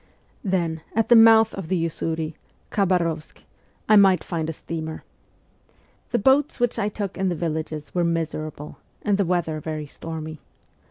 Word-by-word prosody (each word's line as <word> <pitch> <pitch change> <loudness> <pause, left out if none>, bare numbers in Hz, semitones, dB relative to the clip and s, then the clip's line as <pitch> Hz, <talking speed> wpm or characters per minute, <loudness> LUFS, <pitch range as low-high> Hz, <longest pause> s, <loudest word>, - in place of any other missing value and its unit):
Then, 170 -5 -1
at 225 0 +1
the 240 - +8
mouth 225 -1 +7
of 195 -4 -6
the 185 +2 0
Usuri 160 -1 -3 0.4
(Khabarovsk) 170 -5 0 0.4
I 215 - +7
might 195 -2 +5
find 160 -3 -3
a - - 0
steamer. 160 0 -6 1.1
The 240 - +1
boats 265 +6 +3
which 245 -1 +1
I 205 - +1
took 200 -2 -5
in 190 -1 +1
the 175 - -1
villages 155 -2 -4
were 175 - +1
miserable, 155 -3 -3 0.2
and 205 -1 +1
the 200 - +3
weather 170 -3 0
very 155 0 -4
stormy. 160 +1 -7
170 Hz, 155 wpm, -24 LUFS, 160-200 Hz, 1.1 s, the